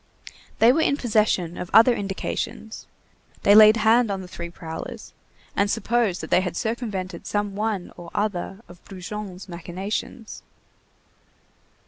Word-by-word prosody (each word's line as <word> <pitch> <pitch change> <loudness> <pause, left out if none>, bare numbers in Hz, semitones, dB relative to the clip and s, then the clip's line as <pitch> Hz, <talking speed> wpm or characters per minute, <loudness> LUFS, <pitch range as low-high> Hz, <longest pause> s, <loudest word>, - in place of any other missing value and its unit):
They 235 +2 +6
were 320 - +2
in 280 - +2
possession 210 - +1
of 180 - -5
other 230 +2 +8
indications; 205 +2 -4 0.6
they 200 - +6
laid 215 +1 +8
hand 225 +1 +4
on 195 -1 -2
the - - -9
three 170 -1 -7
prowlers, 160 -1 -8 0.4
and 200 0 +2
supposed 225 -3 0
that - - -8
they 180 - +5
had 180 -3 -4
circumvented 215 -5 -4
some 205 -1 -2
one 210 -3 -2
or 175 -1 -10
other 200 -1 -2
of 175 0 -15
Brujon's 190 0 -7
machinations. 190 +6 -5
205 Hz, 135 wpm, -24 LUFS, 180-220 Hz, 0.6 s, other